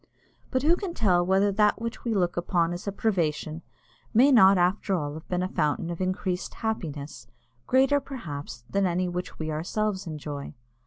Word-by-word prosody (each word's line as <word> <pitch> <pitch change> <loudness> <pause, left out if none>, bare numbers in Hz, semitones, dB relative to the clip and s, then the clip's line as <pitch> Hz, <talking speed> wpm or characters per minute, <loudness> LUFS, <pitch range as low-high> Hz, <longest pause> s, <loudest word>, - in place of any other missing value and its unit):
But 260 0 0
who 330 +3 +5
can 360 -2 -5
tell 180 -5 +3
whether 190 +3 +3
that 210 +2 +3
which 230 0 -5
we 230 -2 -1
look 175 -3 +1
upon 175 -1 +1
as 175 +3 -7
a - - 0
privation 165 -6 -1 0.5
may 265 +5 +6
not 195 -6 +7
after 185 +2 +1
all 150 -2 -3
be 180 - 0
a 180 +1 0
fountain 165 0 -1
of 170 - -5
increased 185 0 -2
happiness, 155 -10 -4 0.4
greater, 270 +2 +4
perhaps, 155 - -7
than 200 -1 +1
any 180 +1 0
which 180 0 -5
we 155 0 -3
ourselves 190 +5 -2
enjoy? 150 -2 -6
185 Hz, 170 wpm, -27 LUFS, 165-215 Hz, 0.5 s, not